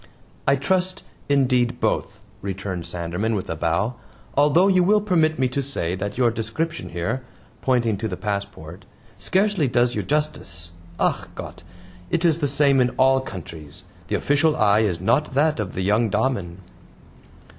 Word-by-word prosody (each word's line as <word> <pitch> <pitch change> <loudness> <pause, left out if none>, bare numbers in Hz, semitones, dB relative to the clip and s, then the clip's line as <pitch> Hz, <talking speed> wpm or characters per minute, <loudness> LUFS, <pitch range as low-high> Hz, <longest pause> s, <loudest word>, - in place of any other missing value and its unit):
"I 135 - +5
trust, 185 +7 -1 0.3
indeed, 125 -3 +2
both," 100 -2 -1 0.2
returned 95 -3 -4
Sanderman, 90 +6 -2
with 95 - -3
a - - -2
bow, 85 +9 0 0.4
"although 150 +6 +5
you 185 -2 +4
will 210 +4 +4
permit 165 -6 +2
me 130 - +2
to 140 +3 -1
say 130 -11 -2
that 100 +3 -4
your 120 -2 +3
description 115 +10 -3
here," 105 +10 -2 0.4
pointing 120 -5 +1
to 110 +3 -2
the 90 -4 -5
passport, 95 -3 -5 0.3
"scarcely 190 -5 +1
does 120 0 +2
you - - -1
justice. 95 - -2 0.3
ACH - - 0
GOTT! - - -8 0.5
it 170 +1 0
is 165 -1 +3
the 145 - +1
same 140 -1 +3
in 125 - +3
all 135 0 +5
countries; 80 - -9 0.2
the - - -1
official 150 +2 +2
eye 105 -5 +4
is 100 -6 +1
not 130 +4 +1
that 150 -1 +2
of 105 -4 -3
the 95 - -1
young 105 +4 +2
DAMEN." 105 -5 -1
120 Hz, 160 wpm, -23 LUFS, 95-145 Hz, 0.5 s, I